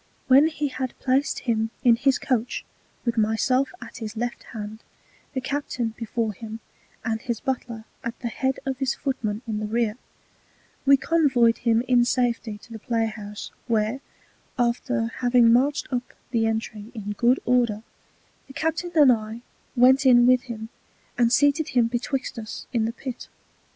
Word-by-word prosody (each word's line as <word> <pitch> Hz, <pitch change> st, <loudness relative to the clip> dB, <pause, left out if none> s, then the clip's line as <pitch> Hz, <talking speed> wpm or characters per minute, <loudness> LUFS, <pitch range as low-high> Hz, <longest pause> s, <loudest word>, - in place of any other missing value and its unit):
When 275 Hz, +4 st, +7 dB
he 300 Hz, -2 st, -2 dB
had 260 Hz, -1 st, -4 dB
placed 270 Hz, +2 st, +1 dB
him 225 Hz, -2 st, 0 dB
in 240 Hz, -2 st, +6 dB
his 265 Hz, +3 st, +2 dB
Coach, 245 Hz, -2 st, -1 dB, 0.4 s
with 235 Hz, -1 st, +1 dB
my 220 Hz, +1 st, +2 dB
self 260 Hz, +4 st, +1 dB
at -, -, -10 dB
his 220 Hz, -1 st, -6 dB
Left 240 Hz, +1 st, -3 dB
Hand, 215 Hz, -1 st, -7 dB, 0.6 s
the 260 Hz, -, 0 dB
Captain 260 Hz, -3 st, -2 dB
before 230 Hz, -1 st, -2 dB
him, 220 Hz, +2 st, -8 dB, 0.5 s
and 220 Hz, -1 st, -1 dB
his 235 Hz, -2 st, -3 dB
Butler 250 Hz, -4 st, -3 dB, 0.2 s
at 235 Hz, 0 st, -4 dB
the 240 Hz, -, -3 dB
Head 265 Hz, +3 st, -1 dB
of 265 Hz, -1 st, -2 dB
his 270 Hz, -1 st, 0 dB
Footmen 220 Hz, -5 st, -3 dB
in 215 Hz, -2 st, -3 dB
the 215 Hz, -, -3 dB
Rear, 225 Hz, 0 st, 0 dB, 0.9 s
we 275 Hz, 0 st, +8 dB
convoy'd 265 Hz, -8 st, +3 dB
him 230 Hz, -1 st, +2 dB
in 245 Hz, -1 st, +5 dB
safety 240 Hz, -3 st, 0 dB
to -, -, -16 dB
the 220 Hz, -, -7 dB
Play 225 Hz, +1 st, 0 dB
house, 210 Hz, -1 st, -7 dB, 0.2 s
where, 225 Hz, +3 st, 0 dB, 0.6 s
after 120 Hz, -, 0 dB
having 245 Hz, -2 st, +5 dB
marched 280 Hz, +4 st, +2 dB
up 245 Hz, 0 st, -3 dB, 0.2 s
the 225 Hz, -2 st, +2 dB
Entry 220 Hz, 0 st, -3 dB
in 205 Hz, -2 st, -4 dB
good 240 Hz, +5 st, +3 dB
order, 235 Hz, -4 st, +2 dB, 0.6 s
the 270 Hz, -, -12 dB
Captain 320 Hz, +4 st, -2 dB
and 290 Hz, -5 st, +7 dB
I 220 Hz, 0 st, -2 dB, 0.3 s
went 260 Hz, +2 st, +6 dB
in 240 Hz, -1 st, +7 dB
with 250 Hz, +1 st, +3 dB
him, 220 Hz, -1 st, -6 dB, 0.5 s
and 235 Hz, -1 st, +3 dB
seated 285 Hz, +3 st, +3 dB
him 240 Hz, -, +6 dB
betwixt 245 Hz, +2 st, -2 dB
us 220 Hz, -1 st, -7 dB
in 225 Hz, -2 st, +2 dB
the 225 Hz, -, -1 dB
Pit. 250 Hz, 0 st, -7 dB
240 Hz, 165 wpm, -25 LUFS, 225-260 Hz, 0.9 s, we